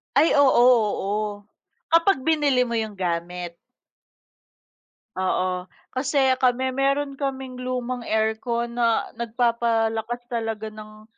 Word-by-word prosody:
Ay 320 Hz, -, +4 dB
oo, 280 Hz, -3 st, +5 dB
oo. 210 Hz, -3 st, +2 dB, 0.5 s
Kapag 335 Hz, +1 st, +4 dB
binili 280 Hz, -4 st, +2 dB
mo 235 Hz, -, -2 dB
'yong 220 Hz, -2 st, -2 dB
gamit. 175 Hz, 0 st, -3 dB, 1.6 s
Oo. 185 Hz, -1 st, -1 dB, 0.2 s
Kasi 265 Hz, 0 st, +2 dB
kami 260 Hz, 0 st, +2 dB
mayro'n 275 Hz, +1 st, 0 dB
kaming 265 Hz, -2 st, -4 dB
lumang 255 Hz, 0 st, -3 dB
aircon 220 Hz, +2 st, -1 dB
na 230 Hz, -1 st, +1 dB
nagpapalakas 235 Hz, 0 st, 0 dB
talaga 225 Hz, -2 st, -3 dB
ng, 215 Hz, 0 st, -12 dB
235 Hz, 100 wpm, -24 LUFS, 215-260 Hz, 1.6 s, oo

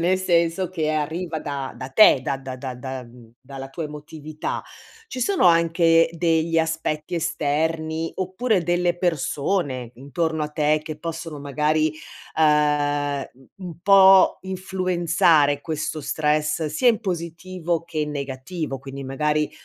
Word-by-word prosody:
nel 180 Hz, +3 st, +2 dB
senso 170 Hz, 0 st, +1 dB
che 160 Hz, -4 st, -1 dB
arriva 160 Hz, +2 st, -2 dB
da 140 Hz, -2 st, -5 dB
da 130 Hz, -, -6 dB
te, 175 Hz, -6 st, +6 dB
da 140 Hz, -1 st, -1 dB
da 130 Hz, -1 st, -7 dB
da 130 Hz, -1 st, -6 dB
da 130 Hz, 0 st, -6 dB
mhmm, 120 Hz, -1 st, -16 dB
dalla 135 Hz, 0 st, -9 dB
tua 165 Hz, -, -6 dB
emotività. 150 Hz, +1 st, -6 dB, 0.5 s
Ci 255 Hz, -, -6 dB
sono 360 Hz, -, +2 dB
anche 165 Hz, -1 st, +4 dB
degli 165 Hz, 0 st, +1 dB
aspetti 160 Hz, 0 st, -2 dB
esterni, 160 Hz, 0 st, -1 dB
oppure 190 Hz, +2 st, 0 dB
delle 175 Hz, 0 st, +1 dB
persone 145 Hz, -5 st, -1 dB
intorno 155 Hz, +5 st, -2 dB
a 150 Hz, -, -4 dB
te 150 Hz, 0 st, +1 dB
che 155 Hz, -1 st, -6 dB
possono 165 Hz, -2 st, -6 dB
magari, 150 Hz, +2 st, +1 dB, 0.4 s
uhm, 145 Hz, -2 st, +2 dB, 0.3 s
mhmm, 185 Hz, -2 st, -8 dB
un 165 Hz, -2 st, -9 dB
po' 195 Hz, -1 st, +7 dB
influenzare 175 Hz, -6 st, +1 dB
questo 155 Hz, 0 st, -3 dB
stress 150 Hz, +2 st, 0 dB
sia 155 Hz, -, -1 dB
in 225 Hz, -3 st, +2 dB
positivo 170 Hz, -1 st, -3 dB
che 165 Hz, -2 st, -7 dB
in 150 Hz, 0 st, -1 dB
negativo? 140 Hz, +2 st, -5 dB
Quindi, 135 Hz, 0 st, -8 dB
magari 150 Hz, +3 st, 0 dB
155 Hz, 135 wpm, -23 LUFS, 145-170 Hz, 0.5 s, po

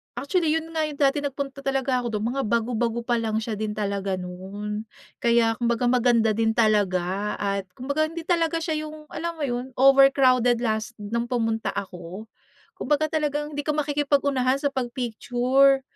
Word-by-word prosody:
Actually 310 Hz, +5 st, 0 dB
'yun 325 Hz, 0 st, -3 dB
nga 320 Hz, -1 st, 0 dB
'yung 295 Hz, -, -7 dB
dati 280 Hz, 0 st, +3 dB
nagpunta 280 Hz, -1 st, -4 dB
talaga 270 Hz, -2 st, 0 dB
ako 240 Hz, -2 st, -4 dB
do'n, 210 Hz, -, -2 dB
mga 275 Hz, -, -1 dB
bago-bago 235 Hz, +1 st, 0 dB
pa 240 Hz, -1 st, +1 dB
lang 220 Hz, -1 st, -1 dB
siya 220 Hz, -2 st, -4 dB
din 215 Hz, -1 st, -2 dB
talaga 200 Hz, -2 st, -2 dB
no'n. 195 Hz, +4 st, -6 dB, 0.3 s
Kaya 235 Hz, -1 st, +3 dB
kumbaga 235 Hz, 0 st, 0 dB
maganda 240 Hz, -3 st, +3 dB
din 225 Hz, +1 st, +1 dB
talaga 200 Hz, -2 st, +1 dB
at 200 Hz, -1 st, -2 dB
kumbaga 285 Hz, +5 st, -1 dB
hindi 330 Hz, +1 st, -7 dB
talaga 330 Hz, -1 st, +1 dB
siya 310 Hz, -2 st, -2 dB
'yung, 305 Hz, 0 st, -11 dB
alam 335 Hz, +1 st, -3 dB
mo 315 Hz, -, -5 dB
'yun, 250 Hz, -1 st, -3 dB
overcrowded 265 Hz, -3 st, +5 dB
last 220 Hz, 0 st, -2 dB
no'ng 235 Hz, +3 st, -2 dB
pumunta 225 Hz, -3 st, -1 dB
ako. 185 Hz, +1 st, -6 dB, 0.5 s
Kumbaga 305 Hz, +1 st, +1 dB
talagang, 295 Hz, -1 st, -1 dB
hindi 290 Hz, -, -3 dB
ka 300 Hz, -, +1 dB
makikipag-unahan 285 Hz, -3 st, +1 dB
sa 285 Hz, -, +1 dB
pag-picture. 255 Hz, +2 st, +2 dB
245 Hz, 160 wpm, -25 LUFS, 220-285 Hz, 0.5 s, overcrowded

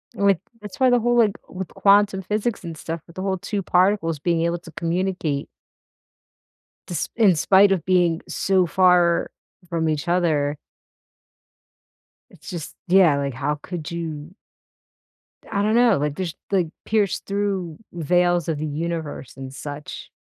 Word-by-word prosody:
like 200 Hz, -3 st, +3 dB, 0.2 s
that's 210 Hz, -2 st, -10 dB
why 260 Hz, -1 st, +5 dB
the 245 Hz, -1 st, +4 dB
whole, 240 Hz, +1 st, +1 dB
like 220 Hz, -3 st, +5 dB, 0.2 s
with 190 Hz, -1 st, -5 dB
quantum 200 Hz, -1 st, +3 dB
physics 210 Hz, +4 st, -2 dB
and 165 Hz, -2 st, -7 dB
stuff 165 Hz, +1 st, -5 dB
with 170 Hz, -, -16 dB
the 185 Hz, -, -5 dB
whole 190 Hz, -1 st, -1 dB
2 200 Hz, +2 st, -3 dB
particles 180 Hz, -4 st, +2 dB
being 170 Hz, +2 st, 0 dB
able 170 Hz, +1 st, 0 dB
to 165 Hz, -1 st, -13 dB
communicate 170 Hz, -4 st, -2 dB, 1.4 s
desp 175 Hz, -4 st, -3 dB
in 210 Hz, -6 st, +5 dB
spite 195 Hz, +6 st, +5 dB
of 185 Hz, -4 st, 0 dB
being 175 Hz, -3 st, +2 dB
so 190 Hz, -2 st, +1 dB
far 175 Hz, 0 st, +3 dB, 0.4 s
from 165 Hz, -2 st, 0 dB
each 155 Hz, 0 st, -2 dB
other 155 Hz, -5 st, +1 dB, 1.7 s
it's -, -, -13 dB
just 170 Hz, -4 st, -6 dB
yeah, 175 Hz, -6 st, +5 dB
like, 140 Hz, -1 st, -2 dB
how 145 Hz, +4 st, -2 dB
could 170 Hz, -4 st, -6 dB
you 160 Hz, -1 st, -5 dB, 1.2 s
I 200 Hz, -2 st, 0 dB
don't 215 Hz, +2 st, +2 dB
know, 240 Hz, -4 st, +5 dB
like, 145 Hz, 0 st, -1 dB
just, 175 Hz, -2 st, -4 dB, 0.2 s
like, 185 Hz, -4 st, +2 dB, 0.2 s
pierce 210 Hz, -3 st, +1 dB
through 195 Hz, -5 st, -2 dB, 0.2 s
veils 175 Hz, +1 st, +1 dB
of 160 Hz, -2 st, -1 dB
the 155 Hz, -, -3 dB
universe 155 Hz, -3 st, -4 dB
and 135 Hz, -1 st, -7 dB
such. 145 Hz, +1 st, -8 dB
175 Hz, 150 wpm, -23 LUFS, 160-195 Hz, 1.7 s, why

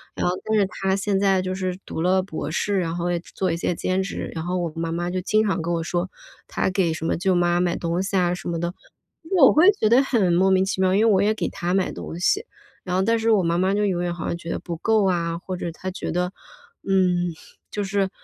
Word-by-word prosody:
然 -, -, -2 dB
后 175 Hz, -, +1 dB
但 220 Hz, 0 st, +1 dB
是 200 Hz, -, +4 dB
他 190 Hz, 0 st, -1 dB
现 200 Hz, 0 st, 0 dB
在 195 Hz, -1 st, +3 dB
就 185 Hz, 0 st, -3 dB
是 185 Hz, -1 st, -3 dB
读 160 Hz, -, -5 dB
了 185 Hz, +1 st, +2 dB
博 160 Hz, -5 st, -5 dB
士， 200 Hz, +3 st, 0 dB
然 170 Hz, -2 st, -2 dB
后 175 Hz, 0 st, -1 dB
也 175 Hz, -, 0 dB
做 180 Hz, +1 st, -3 dB
一 165 Hz, -, -1 dB
些 175 Hz, -, -1 dB
兼 185 Hz, +3 st, 0 dB
职， 195 Hz, -, -5 dB
然 160 Hz, 0 st, -5 dB
后 180 Hz, +1 st, -1 dB
我 170 Hz, -2 st, -2 dB
妈 165 Hz, 0 st, -2 dB
妈 175 Hz, +1 st, -2 dB
就 185 Hz, -, -2 dB
经 215 Hz, +3 st, +2 dB
常 190 Hz, -3 st, 0 dB
跟 170 Hz, +1 st, -2 dB
我 165 Hz, -, -1 dB
说 175 Hz, +2 st, -2 dB, 0.4 s
他 -, -, -1 dB
给 185 Hz, -3 st, +1 dB
什 160 Hz, -, -5 dB
么 -, -, 0 dB
舅 190 Hz, +1 st, +1 dB
妈 175 Hz, 0 st, +2 dB
买 175 Hz, -1 st, +1 dB
东 170 Hz, +2 st, -1 dB
西 195 Hz, +1 st, -3 dB
啊 180 Hz, -1 st, +2 dB
什 180 Hz, -, -6 dB
么 170 Hz, -, -2 dB
的， 175 Hz, +1 st, -2 dB, 0.6 s
我 270 Hz, -5 st, +8 dB
会 330 Hz, +6 st, +6 dB
觉 215 Hz, -, +4 dB
得 245 Hz, +4 st, +6 dB
很 210 Hz, -10 st, +2 dB
莫 185 Hz, +3 st, +4 dB
名 190 Hz, 0 st, +4 dB
其 190 Hz, 0 st, -2 dB
妙， 185 Hz, 0 st, +3 dB
因 215 Hz, -, +4 dB
为 225 Hz, -, +5 dB
我 190 Hz, -, +3 dB
也 210 Hz, +2 st, +3 dB
给 220 Hz, -, -2 dB
她 175 Hz, +1 st, -3 dB
买 190 Hz, -1 st, +1 dB
东 165 Hz, -, -7 dB
西， 420 Hz, -, +2 dB, 0.4 s
然 180 Hz, -1 st, -2 dB
后 190 Hz, -, +2 dB
但 230 Hz, +3 st, +2 dB
是 225 Hz, 0 st, +2 dB
我 205 Hz, -4 st, +4 dB
妈 170 Hz, 0 st, +1 dB
妈 190 Hz, +2 st, +2 dB
就 210 Hz, 0 st, +1 dB
永 180 Hz, -3 st, 0 dB
远 175 Hz, -1 st, -1 dB
好 165 Hz, -, -6 dB
像 170 Hz, -, -2 dB
觉 170 Hz, 0 st, -9 dB
得 -, -, -1 dB
不 170 Hz, -2 st, -6 dB
够 220 Hz, +3 st, +2 dB
啊， 170 Hz, -2 st, 0 dB
或 185 Hz, +1 st, -6 dB
者 175 Hz, -, -4 dB
她 185 Hz, +2 st, -5 dB
觉 185 Hz, -, -5 dB
得 180 Hz, +1 st, -1 dB, 0.6 s
嗯， 180 Hz, -2 st, +2 dB, 0.4 s
就 205 Hz, -, -3 dB
是 195 Hz, -1 st, 0 dB
185 Hz, 290 characters per minute, -23 LUFS, 175-195 Hz, 0.6 s, 我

